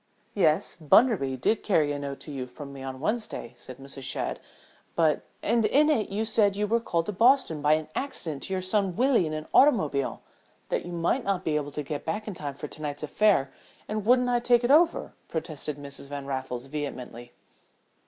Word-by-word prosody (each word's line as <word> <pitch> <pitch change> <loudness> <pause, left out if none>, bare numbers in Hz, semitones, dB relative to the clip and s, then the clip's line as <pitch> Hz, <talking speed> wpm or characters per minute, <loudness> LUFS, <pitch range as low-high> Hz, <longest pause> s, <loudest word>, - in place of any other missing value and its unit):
"Yes, 160 -6 +2
Bunderby 155 - +4
did 215 - +1
carry 155 -8 +2
a 145 - -3
note 140 -1 -5
to 150 - -8
you 130 -3 -4
from 140 +3 -10
me 135 - -9
on 130 0 -6
Wednesday," 210 - -3
said 125 +1 -10
Mrs. 135 0 -9
Shadd. - - -2 0.6
"But 160 -3 +3
" - - -38
"And 230 +1 +2
in 295 +8 +4
it 225 -8 +1
you 210 +3 -1
said 210 -2 +3
that - - -9
you 210 - +1
were 230 +3 +2
called 170 -7 -1
to - - -2
Boston 225 - +3
by 150 +1 +4
an 155 0 0
accident 165 - -3
to 190 - -2
your 185 -1 -1
son 190 -1 0
Willie 245 - +3
in - - -4
his 155 0 -4
automobile: 155 - +3 0.5
that - - -2
you - - -6
might 175 +9 0
not 195 -2 -1
be 155 - +1
able 145 -1 -1
to 150 - -3
get 145 +1 -5
back 210 +7 -3
in 210 - -4
time 145 -5 -6
for 150 - -6
to 155 - -10
night's 145 0 -4
affair 155 -5 +2 0.3
and 215 -1 -3
wouldn't 250 +3 +4
I 245 -1 +2
take 240 0 +3
it 240 - +2
over," 330 +3 +4
protested 155 -2 -4
Mrs. 140 -1 -9
Van 140 -1 -5
Raffles, 130 -2 -4
vehemently. 130 -4 -6
160 Hz, 210 wpm, -27 LUFS, 140-215 Hz, 0.6 s, Bunderby